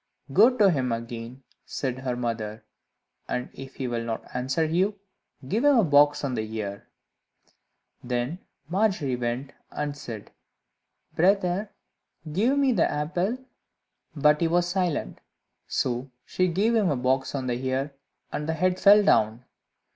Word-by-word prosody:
"Go 235 - +6
to 200 -4 +6
him 130 -6 0
again," 115 +2 -6 0.2
said 130 -2 -3
her 130 -2 -2
mother, 110 -3 -4 0.6
"and 125 - -3
if 135 0 -10
he 130 - -3
will 120 -1 -2
not 115 -1 -4
answer 130 +6 0
you, 185 +6 +1 0.5
give 220 - 0
him 290 -2 +6
a 225 - +5
box 145 -2 +4
on 135 -2 -1
the 115 - -1 0.2
ear." 100 -2 -5 1.2
Then 125 +7 -2 0.3
Margery 180 - +1
went, 125 +3 -3 0.2
and 145 -1 -3
said, 115 -7 -8 0.8
"Brother, 190 +2 +2 0.6
give 235 - +2
me 275 -2 +3
the 235 - +2
apple." 175 +10 -1 0.8
But 150 +1 +4
he 165 - +3
was 175 +1 +2
silent, 180 -4 -1 0.5
so 125 +2 -1 0.2
she 185 - +1
gave 200 +7 +1
him 215 -5 +3
a 145 - 0
box 130 +2 0
on 135 -2 -2
the 125 0 -2
ear, 135 +2 -1 0.4
and 150 +1 -3
the - - +1
head 185 +3 +1
fell 205 +1 +7
down. 110 - +2
145 Hz, 145 wpm, -26 LUFS, 125-185 Hz, 1.2 s, fell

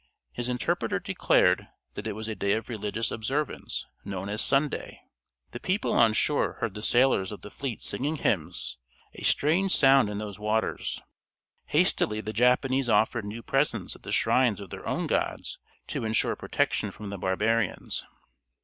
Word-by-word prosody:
His 120 - -3
interpreter 125 0 0
declared - - +2 0.3
that - - -5
it - - -2
was 110 +1 -6
a 110 - -2
day 100 -1 0
of 110 +1 -3
religious 110 0 -2
observance, 135 +7 -2 0.2
known 95 0 -5
as 105 +1 +1
Sunday. 140 +1 +2 0.5
The 120 - -6
people 190 - 0
on 115 -2 +5
shore 145 +6 +1
heard 110 - -3
the 105 - -7
sailors 120 -5 +3
of 105 - -8
the 105 - -9
fleet 135 -5 -5
singing 145 +5 -1
hymns, 80 - -2 0.4
a - - -11
strange 180 +6 +3
sound 135 -5 +6
in 105 - -4
those 105 -2 -6
waters. 105 +1 -1 0.6
Hastily 105 0 +2
the 110 0 -5
Japanese 125 +2 +2
offered 110 +1 +2
new 110 +3 -6
presents 135 - 0
at - - -16
the - - -7
shrines 125 -6 +3
of 100 -3 -9
their - - -7
own - - -1
gods - - -2 0.3
to - - -3
ensure 110 0 +1
protection - - 0
from 105 -1 -8
the 100 - -5
barbarians. 105 +3 0
110 Hz, 165 wpm, -27 LUFS, 105-130 Hz, 0.6 s, sound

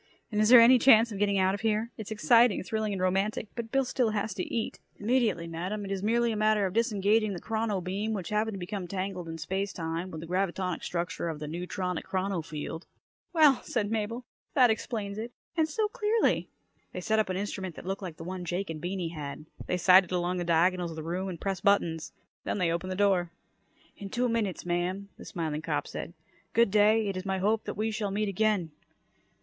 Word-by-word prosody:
"And 210 0 +1
is 215 - +4
there 245 -1 +10
any 245 +2 +8
chance 230 -2 +6
of 200 - -5
getting 200 -1 +2
out 190 0 +3
of 200 - -4
here? 220 +1 0
It's 220 -3 -7
exciting, 230 +1 +4
thrilling, 220 +1 -2
and 195 - -3
romantic, 195 +3 0
but 230 -2 -6
Bill 270 -1 +2
still 245 -2 +1
has 215 0 -2
to 180 - -5
eat." 225 - -2 0.2
"Immediately, 220 -6 +1
Madam! 185 +5 -4
It 195 - -6
is 195 -1 -2
merely 235 +3 +2
a - - -2
matter 215 -1 +3
of 185 - -2
disengaging 215 -2 +2
the 175 - -5
chrono 220 -2 -1
beam, 195 +5 -2
which 190 -5 -4
happened 215 0 0
to - - -6
become 185 0 -4
tangled, 185 -2 -4
in 165 - -5
space 190 +5 -2
time, 165 +1 -4
with 160 - -7
the - - -7
gravitonic 180 0 -1
structure 170 -1 -2
of 160 - -4
the 150 - -6
neutronic 180 +2 -3
chrono 190 -1 -1
field." 155 +2 -6 0.4
"Well!" 305 -6 +5
said 215 -3 -2
Mabel. 225 +3 -2 0.3
"That 250 -4 +6
explains 215 -2 -3
it! 235 +2 -6 0.2
And 320 -1 +2
so 425 +8 0
clearly!" 425 +2 +1 0.4
They 180 - -4
set 220 +2 +1
up 215 - +1
an 185 - -1
instrument 190 -3 -4
that - - -10
looked 195 +2 -3
like 175 -4 -6
the - - -8
one 185 +1 -5
Jake 175 +1 -3
and 155 -2 -7
Beany 180 -1 -2
had. 150 -2 -7 0.2
They 180 - 0
sighted 185 0 +6
along 180 0 0
the 175 - -1
diagonals 175 +1 +2
of 165 - -7
the 160 - -6
room 180 +4 -3
and 175 -3 -6
pressed 195 -2 -3
buttons. 170 -5 +2 0.3
Then - - -2
they 180 -4 +1
opened 175 +3 -2
the - - -2
door. 190 -3 +2 0.7
"In 200 - -7
two 245 +4 0
minutes, 220 -8 -1
ma'am," 180 +3 -2
the - - -10
smiling 155 -3 -3
cop - - -2
said. - - -6 0.4
"Good 230 -3 +4
day. 215 +1 +4
It 195 - -2
is 185 - -4
my 190 0 -1
hope 210 +4 +1
that - - -5
we 220 +1 0
shall 215 -2 -2
meet 205 +1 -1
again." 200 -4 +1
195 Hz, 220 wpm, -29 LUFS, 180-220 Hz, 0.7 s, there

